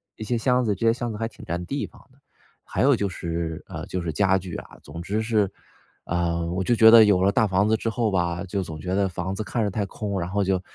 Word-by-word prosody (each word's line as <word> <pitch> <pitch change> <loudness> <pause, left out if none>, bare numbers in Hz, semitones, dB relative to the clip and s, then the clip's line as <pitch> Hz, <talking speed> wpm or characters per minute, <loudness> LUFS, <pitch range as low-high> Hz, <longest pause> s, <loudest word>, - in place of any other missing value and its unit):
一 110 - -7
些 120 +2 -1
箱 125 +1 +2
子， 105 - +1
这 115 +4 0
些 - - +6
箱 120 -1 -4
子 105 - -6
还 115 - -1
挺 - - -13
占 90 +1 -3
地 140 +6 -3
方 - - -18
的。 130 - -25 0.5
还 - - -1
有 140 -1 +5
就 100 -3 -1
是 85 -2 -4
呃， - - -6
就 90 - -3
是 80 -2 -3
家 95 +3 +3
具 90 -2 -6
啊， - - -9
总 85 - -8
之 105 +5 -1
是， 110 -3 +1 0.5
呃， 85 -1 -1
我 95 +1 -1
就 120 - +2
觉 110 0 +8
得 115 -1 +10
有 95 -3 +3
了 100 - +4
大 110 0 +3
房 95 +2 +2
子 110 - +3
之 115 - -2
后 115 -1 0
吧， 85 -1 0
就 95 +1 -2
总 80 -2 -7
觉 90 +4 -2
得 100 -1 +1
房 95 +2 -4
子 110 - -3
看 115 +3 -2
着 105 - 0
太 100 0 -1
空， 100 0 -4
然 85 +1 -3
后 100 +1 0
就 95 -1 0
100 Hz, 295 characters per minute, -24 LUFS, 90-110 Hz, 0.5 s, 得